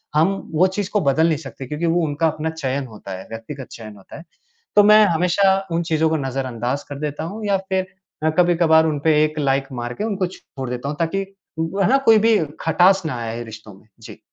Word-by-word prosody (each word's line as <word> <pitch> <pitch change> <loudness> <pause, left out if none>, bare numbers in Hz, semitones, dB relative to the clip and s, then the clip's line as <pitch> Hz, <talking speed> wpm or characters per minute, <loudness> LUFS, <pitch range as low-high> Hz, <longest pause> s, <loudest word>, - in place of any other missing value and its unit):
हम 155 +3 +5 0.3
वो 180 +4 +4
चीज़ 190 +1 -3
को 210 - +1
बदल 150 +2 +3
नहीं 160 -3 +1
सकते 140 -3 -9
क्योंकि 150 +4 -3
वो 170 +1 +2
उनका 150 +2 0
अपना 155 +1 -2
चयन 140 -4 -3
होता 105 -3 -11
है, 95 - -11
व्यक्तिगत 120 +4 -8
चयन 110 -2 -10
होता 95 - -12
है। 165 - -11 0.5
तो 205 - +7
मैं 215 +1 +7
हमेशा 180 +2 +3 0.2
उन 165 +1 +1
चीज़ों 160 -1 +1
को 160 - +1
नज़रअंदाज़ 130 -1 -3
कर 145 -1 -6
देता 150 0 -4
हूँ 210 +6 -6
या 200 -1 +2
फिर 190 -1 0 0.4
मैं 160 - +3
कभी-कभार 165 -2 +4
उनपे 155 +1 +1
एक 155 0 -1
लाइक 135 -1 +1
मार 120 +1 -4
के 205 - -5
उनको 200 -4 -1
छोड़ 135 -7 -9
देता 125 +3 -4
हूँ, 145 - -5
ताकि 195 +4 -1 0.3
वो 165 +5 -1
है - - +3
ना, 270 - +5
कोई 225 -5 +5
भी 225 0 +4 0.2
खटास 180 +4 +4
ना 140 - -2
आए 115 +1 -4
रिश्तों 110 -2 -11
में। 95 +3 -20
जी। - - -12
160 Hz, 220 wpm, -21 LUFS, 135-185 Hz, 0.5 s, तो